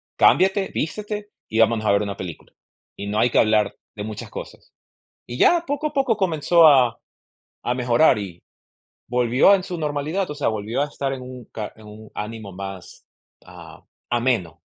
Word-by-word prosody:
cámbiate, 190 +1 +4
vístete, 210 +5 -4 0.2
y 110 - -2
vámonos 115 -1 +3
a 105 - +4
ver 100 - +3
una 100 -1 -4
película, 90 -4 -8 0.4
y 100 - -6
no 105 +1 -1
hay 120 - +4
que - - +2
hablar 110 -1 +3 0.2
de 105 - -5
muchas 105 -1 -7
cosas". - - -10 0.5
Y 120 - -6
ya, 345 - +4
poco 290 +2 -1
a 300 - -9
poco 270 -6 +1
comenzó 170 -3 +4
a 130 -6 +5 0.7
a 120 - +1
mejorar, 125 +2 +3
y 90 -4 -7 0.6
volvió 125 - +4
en 190 - 0
su 180 -2 -5
normalidad, 155 +5 -2
o - - -4
sea, 145 - -1
volvió 110 +4 -2
a - - 0
estar 140 -2 -3
en 130 - -8
un 125 -1 -9
ca 105 -2 -5
en 110 -1 -15
un 105 0 -12
ánimo 105 -1 -6
más, 95 -1 -9 0.4
ah, - - -13 0.3
ameno. 120 -8 0
125 Hz, 180 wpm, -22 LUFS, 105-165 Hz, 0.7 s, a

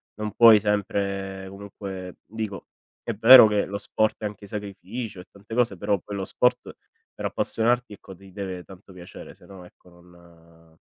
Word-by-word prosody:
non 105 -1 -5
puoi 115 -3 +7
sempre 100 -2 -2
comunque 100 -2 -9
dico, 110 -2 -6 0.4
è 115 - -3
vero 115 +3 +9
che 105 -1 +1
lo 100 +2 -5
sport 110 +1 -1
è 105 - -4
anche 105 -1 -7
sacrificio 105 0 -7
e - - -17
tante 100 +3 -10
cose 115 -6 +1
però 100 +3 0
poi, 100 +3 -8
lo 95 - -3
sport 125 - 0 0.4
per - - -9
appassionarti 120 0 -1
ecco, 95 -1 -13
ti 95 0 -17
deve 95 -3 -6
tanto 95 0 -15
piacere 90 -1 -12
se - - -21
no 95 -2 -13
ecco 90 - -21
non 85 -2 -21
100 Hz, 170 wpm, -24 LUFS, 90-105 Hz, 0.4 s, vero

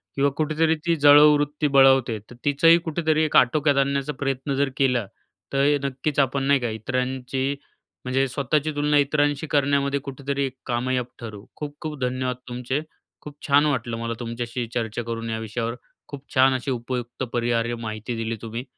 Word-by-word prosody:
किंवा 140 +1 +3
कुठेतरी 155 +1 +2
ती 170 -1 +2
जळावूवृत्ती 150 0 +5
बळावते. 135 -4 +4
तर 125 - -12
तिचाही 165 +4 +5
कुठेतरी 160 -1 +1
एक 155 - -1
आटोक्यात 145 +3 +3
आणण्याचा 140 +1 0
प्रयत्न 135 0 -2
जर 140 0 +1
केला, 125 -5 +2 0.5
तर 140 +2 +3
नक्कीच 140 +2 -2
आपण 135 0 +1
नाही 140 0 +3
का? 120 -2 -2
इतरांची, 130 +4 -2 0.5
म्हणजे 135 +2 +1
स्वतःची 140 +4 -1
तुलना 145 0 +2
इतरांशी 145 +1 +1
करण्यामध्ये 140 0 +1
कुठेतरी 140 0 -3
एक 130 -1 -6
कामयाब 125 +1 -1
ठरू. 110 -3 -9
खूप-खूप 150 0 -6
धन्यवाद 125 0 -1
तुमचे. 125 +3 -2 0.4
खूप 150 -1 -10
छान 145 +1 +5
वाटलं 125 -5 -1
मला 115 0 -3
तुमच्याशी 120 0 -4
चर्चा 115 -1 -2
करून 115 0 -5
या 110 0 -2
विषयावर, 115 +1 -3 0.3
खूप 140 -1 -9
छान 130 0 +5
अशी 130 +2 -3
उपयुक्त 120 0 -4
परिहार्य 120 0 0
माहिती 110 +2 -4
दिली 115 0 -3
तुम्ही, 115 +1 -5
135 Hz, 155 wpm, -24 LUFS, 120-145 Hz, 0.5 s, जळावूवृत्ती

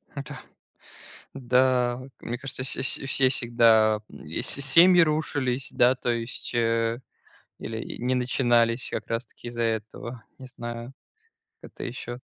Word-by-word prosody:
Да. 140 -2 -7 1.0
Да. 125 -1 +2 0.2
Мне 120 +1 -4
кажется, 135 0 -5
вс 130 - +1
вс 130 - +1
все 135 -1 +4
всегда, 115 -3 +3
и 80 +1 -4
с - - -3
семьи 170 +6 +6
рушились, 145 -5 0
да, 125 +2 +4
то 125 - -4
есть, 115 +2 -4
э, 115 0 +1 0.6
или 110 0 -6
не 125 +2 0
начинались 120 -1 +1
как - - -4
раз 115 +2 -2
таки 120 - -11
из-за 120 0 -4
этого, 115 +1 -4 0.2
не 130 - -10
знаю, 120 0 -7 0.7
это - - -12
еще. 120 -1 -6
120 Hz, 135 wpm, -25 LUFS, 115-130 Hz, 1.0 s, семьи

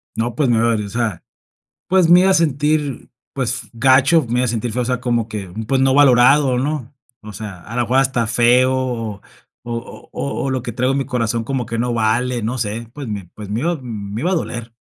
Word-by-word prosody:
No, 115 0 -2
pues, 135 -1 +1
me 115 -2 +3
va 115 0 +2
a, - - +1
o 105 -2 -4
sea, 110 -4 -2 0.6
pues, 185 -2 +3
me 175 +1 +7
iba 190 - +4
a - - +4
sentir, 150 -3 0 0.2
pues 130 -4 -3
gacho, 130 +5 +4
me 120 +2 0
iba - - +1
a - - -1
sentir 115 0 -2
feo, 125 - -1
o - - -1
sea, 125 0 -1
como 120 -3 -1
que, 105 -4 -6 0.2
pues 130 +1 +1
no 135 0 +3
valorado, 135 0 +5
¿no? 140 -1 -3 0.3
O 105 - -9
sea, 100 -4 -8
a 115 - -9
lo 120 - +1
mejor 125 +3 +1
hasta 130 -4 +1
feo, 120 +3 +3
o 115 -6 -3 0.4
o 115 0 -7
o 70 -1 -3
o 135 - -1
lo 130 -1 -1
que 120 -1 -6
traigo 125 +3 +1
en 135 - 0
mi 135 - -1
corazón, 115 -2 -1
como 130 -1 -2
que 115 +1 -4
no 120 0 0
vale, 120 +2 0
no 120 +4 -2
sé, 115 0 -3
pues, 145 -2 -7
me 100 -4 -5
pues, 105 -1 -9
me 105 - -2
me 115 - -1
iba 170 0 -1
me 105 -3 -6
iba 180 - 0
a - - +2
doler. 120 -8 -4
120 Hz, 240 wpm, -19 LUFS, 115-135 Hz, 0.6 s, me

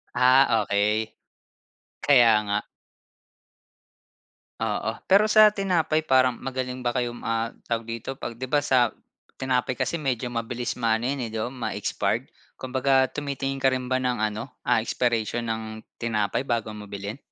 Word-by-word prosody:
Ah, 125 -2 +5
okey, 105 +2 0 0.9
kaya 120 -5 +7
nga. 105 0 0 2.0
Oo. 110 0 -1 0.2
Pero 200 +2 +6
sa 215 0 +7
tinapay 175 -6 0
parang 130 -3 +3
magaling 130 -1 -4
ba 120 - +1
kayong, 120 -1 -2
um - - -11
ah, 115 0 0 0.2
tawag 115 -1 -2
dito, 115 +3 -4
'pag 120 -3 -7
di 130 - -4
ba 145 +3 +1
sa 125 -4 +2 0.5
tinapay 130 -1 0
kasi 170 - -2
medyo 130 -5 -2
mabilis 120 0 -3
maano 115 0 +1
yan 135 -3 -2
eh, 115 - -7 0.2
ma-expired, 125 -2 -2 0.2
kumbaga 130 0 +1
tumitingin 140 -2 -3
ka 135 -1 +2
rin 130 -1 -3
ba 130 - +2
ng 125 -3 -1
ano, 110 +1 -3
ah, - - +2
expiration 120 -1 0
ng 110 0 -2 0.3
tinapay 110 +1 -1
bago 115 -4 -1
mo 105 -1 -8
bilhin? 100 +3 -6
125 Hz, 145 wpm, -25 LUFS, 115-135 Hz, 2.0 s, kaya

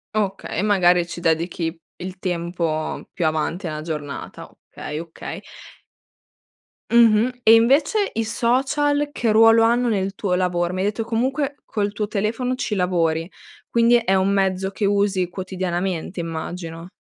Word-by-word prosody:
Okay 200 -2 -2
e - - +2
magari 180 -4 +3
ci 175 - -8
dedichi 165 0 -1 0.2
il 185 +1 -7
tempo 170 -3 -3
più 175 - -1
avanti 160 +4 -1
nella 155 -1 -4
giornata, 150 -3 -6 0.2
okay, 150 +1 -6
okay. 165 -1 -8 1.5
Mh-mh. 235 +1 +4
E 225 - +7
invece 285 - +3
i 225 - -1
social 275 +6 +1
che 230 -5 0
ruolo 225 +1 +6
hanno 240 +1 +3
nel 195 -2 -1
tuo 190 -3 -1
lavoro? 180 -1 0
Mi 185 - -3
hai 190 - 0
detto 210 +2 -1
comunque 265 +5 -1
col 205 -1 -2
tuo 210 0 -3
telefono 225 +5 -1
ci 215 - -2
lavori 170 -3 0 0.4
quindi 235 +1 +4
è 195 -5 +1
un 190 +1 +2
mezzo 190 -1 0
che 200 +1 -2
usi 200 -2 +1
quotidianamente 185 -1 -3
immagino. 165 +1 -6
195 Hz, 145 wpm, -22 LUFS, 175-225 Hz, 1.5 s, E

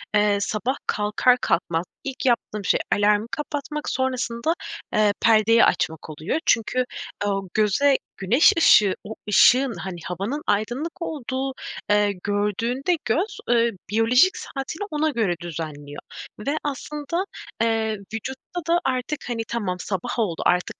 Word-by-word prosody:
eee, 210 -1 +4
sabah 230 +6 -1
kalkar 210 +4 +2
kalkmaz 170 0 0 0.2
ilk 270 -1 -5
yaptığım 215 -4 0
şey - - +3 0.2
alarmı 205 +1 +2
kapatmak 295 0 -4
sonrasında, 260 +2 -1 0.4
eee, 210 -1 +3
perdeyi 225 +1 +5
açmak 160 0 -1
oluyor. 155 - -2
Çünkü, 250 +3 +2 0.4
ooo, 195 -1 -1
göze 220 +7 +3 0.2
güneş 245 - +5
ışığı, 210 - +6
o 220 +1 -7
ışığın 250 +4 +5
hani, 185 -3 -6
havanın 200 - -3
aydınlık 245 - -1
olduğu, 270 -4 -3 0.7
gördüğünde 230 - 0
göz, 405 +6 0
eee, 235 -1 +4 0.2
biyolojik 230 - +4
saatiyle 285 +8 -5
ona 310 +1 +1
göre 220 -10 0
düzenliyor 155 -4 -6 0.5
ve 300 +2 +1
aslında, 295 +4 -3 0.4
eee, 220 -1 +1 0.2
vücutta 265 - -5
da 340 +1 +3
artık 255 +3 -1
hani, 230 -1 -1
tamam 200 -6 -2
sabah 190 +6 -3
oldu 180 -7 -1
artık 180 0 +1
230 Hz, 125 wpm, -23 LUFS, 205-275 Hz, 0.7 s, ışığı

